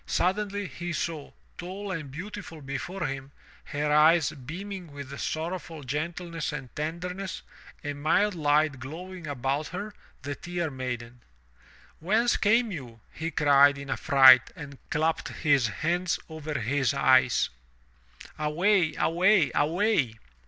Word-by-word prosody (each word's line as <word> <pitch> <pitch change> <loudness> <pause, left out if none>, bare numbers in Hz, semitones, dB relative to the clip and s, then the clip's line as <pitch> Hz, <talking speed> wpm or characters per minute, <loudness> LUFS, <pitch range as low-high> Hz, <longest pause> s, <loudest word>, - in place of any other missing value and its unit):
Suddenly 205 +2 0
he 170 +3 -5
saw, 160 -3 -3 0.3
tall 190 +3 -5
and 160 -6 -4
beautiful 180 +2 -8
before 140 +7 -4
him, 135 -1 -5 0.3
her 150 +1 -2
eyes 155 0 +5
beaming 175 +5 -7
with 140 -1 -8
sorrowful 160 -1 -4
gentleness 165 +4 -3
and 135 -4 -7
tenderness, 180 +5 -4 0.4
a 145 -1 -3
mild 160 +8 +2
light 150 -3 +2
glowing 170 +6 -8
about 140 +2 -2
her 205 +4 -6
— - - -31
the 145 +1 -3
Tear 175 0 -4
Maiden. 125 -2 -5 0.8
"Whence 220 +8 +2
came 225 +2 +3
you?" 125 - -8
he 160 +2 -3
cried 145 -2 +5
in 140 0 -6
a - - +1
fright 130 -4 +7
and 140 -3 -9
clapped 160 +1 0
his 140 -5 +2
hands 170 - -1
over 155 -1 -6
his 135 +3 0
eyes. 130 -3 +4 0.9
"Away! 160 +2 +2
Away! 180 +1 +3
Away!" 155 - +1
155 Hz, 130 wpm, -27 LUFS, 140-180 Hz, 0.9 s, fright